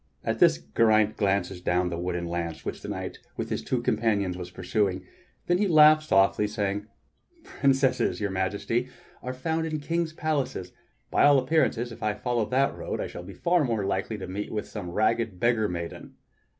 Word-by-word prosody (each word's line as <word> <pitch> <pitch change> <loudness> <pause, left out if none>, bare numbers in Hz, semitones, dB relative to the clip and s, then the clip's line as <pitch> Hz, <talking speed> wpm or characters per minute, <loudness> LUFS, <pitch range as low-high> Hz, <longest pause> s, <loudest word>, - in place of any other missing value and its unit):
At - - -2
this 70 - +6 0.2
Geraint 110 -2 +4
glances 95 -3 0
down 90 0 +1
the 85 - -3
wooden 90 -1 -2
lane 85 -1 -3
which - - -5
the - - -8
knight - - -5 0.2
with - - -4
his - - -2
two - - -1
companions 100 -5 +1
was 90 -1 -7
pursuing, 95 0 -1 0.4
then 175 +1 +2
he 205 - +2
laughed 155 -2 +7
softly, 100 0 +3
saying: 105 -1 -2 0.6
"Princesses, 135 -2 +1
Your 100 -2 -1
Majesty, 100 +6 -1 0.3
are 125 - -4
found 160 +5 -2
in 155 -1 -3
kings' 165 +2 -1
palaces. 145 - -2 0.4
By - - +4
all 145 -1 +7
appearances, 130 -4 +1
if 115 - -11
I 105 -1 0
follow 120 -1 -1
that 135 +4 +1
road, - - -4
I - - -1
shall - - -7
be 90 +2 -10
far 175 - +2
more 115 -6 -1
likely 100 +3 -2
to 95 - -6
meet 100 +3 -5
with 105 -1 -3
some 90 - -6
ragged 110 +1 0
beggar 115 -2 +2
maiden." 85 -1 -6
110 Hz, 185 wpm, -27 LUFS, 95-130 Hz, 0.6 s, laughed